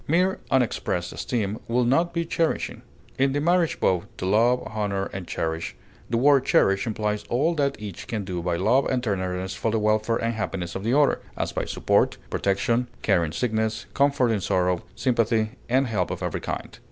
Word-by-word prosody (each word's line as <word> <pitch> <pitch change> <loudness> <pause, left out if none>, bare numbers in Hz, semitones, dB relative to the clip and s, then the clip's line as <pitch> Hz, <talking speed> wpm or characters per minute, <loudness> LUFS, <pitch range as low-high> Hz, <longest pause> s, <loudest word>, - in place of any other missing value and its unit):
Mere 180 +5 +2
unexpressed 120 -8 0
esteem 110 -3 -2
would 120 +1 +2
not 165 +8 +2
be 170 0 -1
cherishing. 165 0 -1 0.4
In 135 0 +3
the 145 - +1
marriage 170 +2 +2
vow, 90 -2 +2 0.2
"to - - -4
love, 115 +6 +3
honor, 105 -3 -2
and 95 -2 -6
cherish," 80 0 -3 0.3
the 115 - +1
word 135 +1 +5
cherish 115 -4 +3
implies 105 -1 -1
all 145 +8 +2
that 140 -3 0
each 105 -4 -7
can 105 -4 -3
do 90 -2 -3
by 85 0 -1
love 110 +10 +3
and 125 -2 0
tenderness 95 -3 -2
for - - -1
the 110 - +1
welfare 110 +1 +2
and 115 0 -1
happiness 95 -5 -3
of 95 - -5
the 120 +6 +2
other, 145 -1 +3 0.2
as - - -1
by - - -2
support, - - +1
protection, 115 +5 +1 0.2
care 95 -5 +3
in 80 - -2
sickness, 110 +3 -1
comfort 140 -4 +3
in 105 -3 0
sorrow, 90 -1 +1
sympathy, 115 -3 +1 0.2
and 130 +3 +3
help 105 -7 -1
of - - -4
every - - -2
kind. - - -5
110 Hz, 190 wpm, -25 LUFS, 95-130 Hz, 0.4 s, word